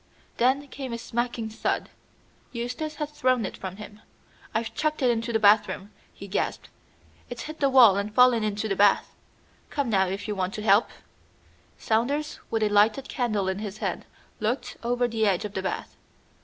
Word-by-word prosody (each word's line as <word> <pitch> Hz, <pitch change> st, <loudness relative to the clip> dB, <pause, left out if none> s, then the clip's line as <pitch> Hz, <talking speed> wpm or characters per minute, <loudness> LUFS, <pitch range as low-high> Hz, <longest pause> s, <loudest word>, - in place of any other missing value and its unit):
Then 265 Hz, +4 st, +2 dB
came 265 Hz, -3 st, -6 dB
a -, -, -2 dB
smacking 235 Hz, 0 st, -3 dB
thud. 220 Hz, -, -2 dB, 0.6 s
Eustace 250 Hz, +6 st, -4 dB
had 300 Hz, -1 st, -3 dB
thrown 255 Hz, -6 st, +1 dB
it -, -, -5 dB
from 190 Hz, -1 st, -7 dB
him. 210 Hz, 0 st, -11 dB, 0.5 s
"I've 225 Hz, 0 st, -2 dB
chucked 310 Hz, -2 st, -1 dB
it 250 Hz, -, +5 dB
into 230 Hz, 0 st, -2 dB
the 225 Hz, -, +3 dB
bathroom," 210 Hz, -1 st, +3 dB, 0.2 s
he -, -, -10 dB
gasped, -, -, -2 dB, 0.6 s
"it's 240 Hz, -1 st, -6 dB
hit 310 Hz, +1 st, -8 dB
the 275 Hz, -, +3 dB
wall 240 Hz, -7 st, +7 dB
and 200 Hz, +1 st, -2 dB
fallen 250 Hz, 0 st, +5 dB
into 210 Hz, +1 st, -1 dB
the 195 Hz, -, -1 dB
bath. 205 Hz, 0 st, +3 dB, 0.6 s
Come 280 Hz, -5 st, -1 dB
now 190 Hz, -2 st, +3 dB
if 195 Hz, +4 st, -4 dB
you 210 Hz, -, -1 dB
want 190 Hz, -1 st, -2 dB
to 210 Hz, -, -5 dB
help." 210 Hz, +2 st, +4 dB, 0.9 s
Saunders, 275 Hz, +7 st, -1 dB
with 225 Hz, -1 st, 0 dB
a 210 Hz, -, +2 dB
lighted 215 Hz, +6 st, +3 dB
candle 215 Hz, -6 st, -1 dB
in 190 Hz, +1 st, -1 dB
his 210 Hz, -1 st, -6 dB
hand, -, -, -3 dB, 0.3 s
looked 225 Hz, +5 st, -2 dB
over 245 Hz, +1 st, +1 dB
the 225 Hz, -2 st, 0 dB
edge 190 Hz, 0 st, +1 dB
of 205 Hz, -, -6 dB
the 190 Hz, -, -2 dB
bath. 190 Hz, -, -4 dB
225 Hz, 185 wpm, -26 LUFS, 205-250 Hz, 0.9 s, wall